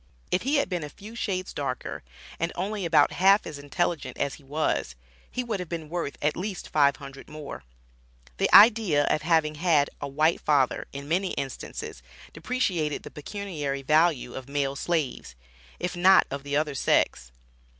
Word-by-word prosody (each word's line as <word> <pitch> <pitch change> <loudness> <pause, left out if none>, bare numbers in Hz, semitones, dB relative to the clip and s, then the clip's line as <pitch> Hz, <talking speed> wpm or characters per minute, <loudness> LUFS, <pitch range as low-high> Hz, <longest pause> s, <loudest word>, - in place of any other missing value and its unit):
If 180 - +2
he 275 +4 0
had 280 - +2
been 180 -3 -3
a 150 - -6
few 210 +9 -12
shades 185 -5 -3
darker 130 -3 -4 0.4
and 170 +1 -1
only 200 +1 -3
about 155 -3 +4
half 195 +3 +4
as 145 - -7
intelligent 160 +2 -2
as 140 - -1
he 145 - -12
was, 135 - -1 0.3
he 250 - -3
would 225 -5 -3
have 180 -3 -6
been 160 -3 -5
worth 170 -4 -3
at 150 +1 +2
least 190 0 -5
$500 140 -2 0
more. 150 - -8 0.7
The - - +1
idea 210 -9 +7
of 155 - +1
having 160 -2 +2
had 155 -5 +3
a 145 - -3
white 155 +4 +1
father, 140 -4 +1
in 140 0 -7
many 185 +4 0
instances, 135 - -6 0.3
depreciated 165 - -1
the - - -9
pecuniary 150 -5 -5
value 155 -3 +2
of 130 0 -8
male 140 -1 -1
slaves, 145 - -2 0.4
if 180 0 -3
not 185 +2 +6
of 140 0 -4
the 145 +1 -1
other 150 -1 0
sex. 65 - +1
155 Hz, 170 wpm, -26 LUFS, 140-180 Hz, 0.7 s, idea